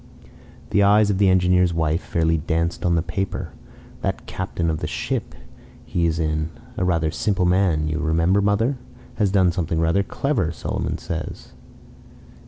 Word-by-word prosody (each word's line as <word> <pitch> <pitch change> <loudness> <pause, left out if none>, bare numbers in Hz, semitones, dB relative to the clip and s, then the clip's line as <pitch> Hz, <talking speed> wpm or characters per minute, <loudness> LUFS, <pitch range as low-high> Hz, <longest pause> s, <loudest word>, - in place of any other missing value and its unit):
The 100 - +3
eyes 105 +1 +5
of 95 - -1
the 100 -2 +5
engineer's 90 -1 +3
wife 80 +1 +1
fairly 80 -1 +1
danced 85 +2 -1
on 85 - +3
the 80 - +1
paper. 90 0 -3 0.5
"That - - -3
captain 85 -1 -2
of 80 - -2
the - - -3
ship - - -3 0.5
he 85 -1 0
is 80 0 -1
in 75 -1 -1 0.3
a - - -1
rather 85 -3 +1
simple 95 0 0
man, 90 -4 +2
you 80 +1 -2
remember, 85 +4 +2
mother? 110 +6 +1 0.4
has 105 -3 +2
done 95 -2 +3
something 85 -2 -1
rather 85 +4 +2
clever, 105 - -1
Solomon - - -3
says." - - -6
85 Hz, 160 wpm, -22 LUFS, 80-95 Hz, 0.5 s, eyes